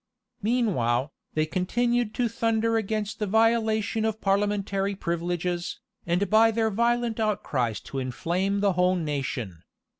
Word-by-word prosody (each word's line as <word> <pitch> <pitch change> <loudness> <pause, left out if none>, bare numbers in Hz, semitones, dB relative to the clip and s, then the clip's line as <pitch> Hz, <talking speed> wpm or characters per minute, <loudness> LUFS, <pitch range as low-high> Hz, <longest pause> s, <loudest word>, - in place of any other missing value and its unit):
Meanwhile, 165 - +1 0.2
they 155 0 +2
continued 235 +7 0
to 245 - +1
thunder 230 0 0
against 215 0 -2
the 210 - -1
violation 220 0 +2
of 220 -1 -1
parliamentary 200 0 0
privileges, 175 0 -2 0.3
and 180 +4 +1
by 220 +3 +5
their 225 0 +1
violent 235 +1 +1
outcries 135 - 0
to 135 - -5
inflame 175 +10 -1
the 200 -2 +3
whole 180 +1 +3
nation. 135 - -3
200 Hz, 125 wpm, -26 LUFS, 175-225 Hz, 0.3 s, by